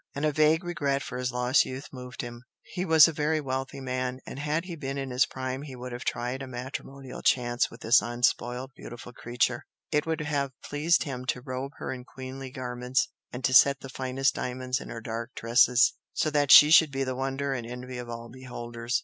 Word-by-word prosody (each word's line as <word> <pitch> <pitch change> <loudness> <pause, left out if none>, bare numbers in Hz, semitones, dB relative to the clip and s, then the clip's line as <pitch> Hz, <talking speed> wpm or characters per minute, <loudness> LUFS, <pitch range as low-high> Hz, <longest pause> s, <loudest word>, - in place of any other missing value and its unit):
And 140 +2 -1
a 155 - +3
vague 155 +3 +3
regret 145 -5 -1
for 125 - -5
his 125 0 -1
lost 125 +2 +3
youth 130 +2 -7
moved 125 -2 -7
him; 120 0 -8 0.2
he 180 0 -4
was 160 -3 +8
a 165 - -2
very 155 +1 +1
wealthy 135 -1 -3
man, 130 -1 -3
and - - -7
had 150 +3 -1
he 175 -2 -6
been 140 -3 -4
in 135 -1 -4
his 125 +1 +3
prime 130 0 -4
he 140 -3 -8
would 125 0 -7
have 120 0 -6
tried 125 +3 -2
a 135 - -6
matrimonial 130 +1 -7
chance 120 -1 +2
with 115 - -14
this 115 +2 +5
unspoilt 120 +2 0
beautiful 120 +1 -10
creature, 120 0 -1 0.3
it 150 0 +1
would 160 -1 -1
have 140 -3 -1
pleased 155 +4 +2
him 130 -5 -5
to 125 - -1
robe 130 +1 -5
her - - -4
in 125 -1 -8
queenly 130 +1 -8
garments 125 -1 -1 0.2
and 125 +1 -7
to 130 - +2
set 140 +1 +6
the 135 - -8
finest 130 +1 0
diamonds 130 +1 -3
in - - -9
her 115 - -6
dark 115 +2 -5
tresses, 125 +3 +4 0.2
so 155 - 0
that 145 -1 +2
she 150 +1 +10
should 160 -2 +7
be 135 0 -1
the 130 -1 -2
wonder 135 +1 -2
and 120 -3 -4
envy 125 +1 -7
of 120 -1 -7
all 115 0 -6
beholders. 120 -1 -4
130 Hz, 215 wpm, -28 LUFS, 125-140 Hz, 0.3 s, she